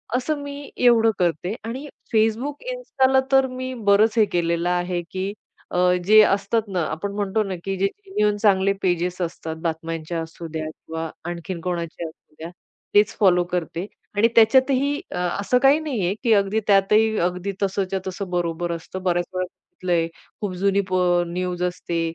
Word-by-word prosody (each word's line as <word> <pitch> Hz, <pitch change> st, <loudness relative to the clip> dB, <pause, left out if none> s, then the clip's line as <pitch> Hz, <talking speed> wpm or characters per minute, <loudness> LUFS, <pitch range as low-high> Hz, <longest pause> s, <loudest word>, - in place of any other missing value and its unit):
असं 290 Hz, +3 st, -1 dB
मी 285 Hz, 0 st, -7 dB
एवढं 230 Hz, -2 st, +5 dB
करते 175 Hz, +4 st, 0 dB
आणि 260 Hz, +6 st, -5 dB, 0.3 s
Facebook, 225 Hz, -, +1 dB
Instaला 265 Hz, -, +2 dB
तर 270 Hz, 0 st, +5 dB
मी 255 Hz, 0 st, -5 dB
बरंच 215 Hz, +3 st, +4 dB
हे 215 Hz, -, +6 dB
केलेलं 170 Hz, 0 st, +1 dB
आहे 175 Hz, 0 st, 0 dB
की 190 Hz, +2 st, -3 dB, 0.4 s
अ, -, -, 0 dB, 0.3 s
जे 215 Hz, +2 st, +7 dB
असतात 200 Hz, +3 st, +2 dB
ना 185 Hz, -3 st, -1 dB
आपण 180 Hz, +6 st, -3 dB
म्हणतो 205 Hz, +1 st, 0 dB
ना, 190 Hz, -2 st, -4 dB
की 195 Hz, 0 st, -1 dB
जे 195 Hz, +1 st, +2 dB
जेन्युइन 210 Hz, -, -1 dB
चांगले 195 Hz, -2 st, +3 dB
पेजेस 180 Hz, 0 st, 0 dB
असतात 165 Hz, -1 st, -4 dB
बातम्यांच्या 165 Hz, 0 st, -3 dB
असूद्या 160 Hz, -1 st, -6 dB
किंवा 160 Hz, 0 st, -6 dB, 0.2 s
आणखीन 175 Hz, +1 st, -5 dB
कोणाचे 170 Hz, -1 st, -3 dB
असू 160 Hz, -, -17 dB
द्या, 165 Hz, +2 st, -6 dB, 0.4 s
तेच 205 Hz, 0 st, +4 dB
फॉलो 180 Hz, -3 st, +5 dB
करते 175 Hz, +1 st, -2 dB, 0.3 s
आणि 220 Hz, +3 st, +5 dB
त्याच्यातही 260 Hz, +5 st, +4 dB, 0.2 s
अ, -, -, -4 dB, 0.2 s
असं 225 Hz, +5 st, +2 dB
काही 280 Hz, +3 st, +6 dB
नाहीये 225 Hz, -, -1 dB
की 230 Hz, -2 st, +4 dB
अगदी 200 Hz, +2 st, +2 dB
त्यातही, 210 Hz, +2 st, +4 dB
अगदी 180 Hz, +2 st, -4 dB
तसंच्या 195 Hz, 0 st, -1 dB
तसं 190 Hz, 0 st, -5 dB
बरोबर 175 Hz, -1 st, -1 dB
असतं. 170 Hz, +3 st, -6 dB
बऱ्याच 175 Hz, -1 st, +1 dB
वेळा 185 Hz, 0 st, -1 dB
बघितलंय 175 Hz, -2 st, -2 dB, 0.3 s
खूप 200 Hz, -3 st, -2 dB
जुनी 200 Hz, 0 st, +3 dB
पो 175 Hz, -1 st, +3 dB
न्यूज 180 Hz, 0 st, -3 dB
असते 175 Hz, -1 st, -2 dB
190 Hz, 160 wpm, -23 LUFS, 175-220 Hz, 0.4 s, जे